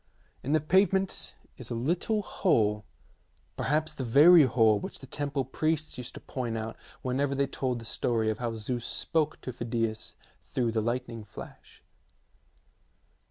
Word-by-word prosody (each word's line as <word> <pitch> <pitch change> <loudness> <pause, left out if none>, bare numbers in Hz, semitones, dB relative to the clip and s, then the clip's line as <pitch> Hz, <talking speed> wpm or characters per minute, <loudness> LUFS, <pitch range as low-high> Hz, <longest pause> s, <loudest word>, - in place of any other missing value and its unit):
In 140 - -1
the 155 - +5
pave 190 +7 +3
ment 190 0 -1 0.2
is - - -8
a 120 - -2
little 175 - 0
hole, 105 - +1 0.7
perhaps 155 +2 0
the 135 - -4
very 150 +7 +8
hole 115 -4 +4
which - - -6
the - - -11
temple 140 -1 -2
priests 155 +3 -1
used 125 +1 -7
to - - -7
point 120 -4 -4
out 110 0 -4 0.3
whenever 135 +2 0
they 140 +1 +2
told 130 -2 -2
the 115 - -8
story 110 -1 0
of 110 - -5
how 120 -2 -2
Zeus 120 +2 -3
spoke 155 +2 -1
to 130 - -5
Phidias 115 -2 -2 0.3
through 120 -3 -1
the 110 -1 0
lightning 120 0 -3
flash. 105 - -12
125 Hz, 160 wpm, -29 LUFS, 115-150 Hz, 0.7 s, very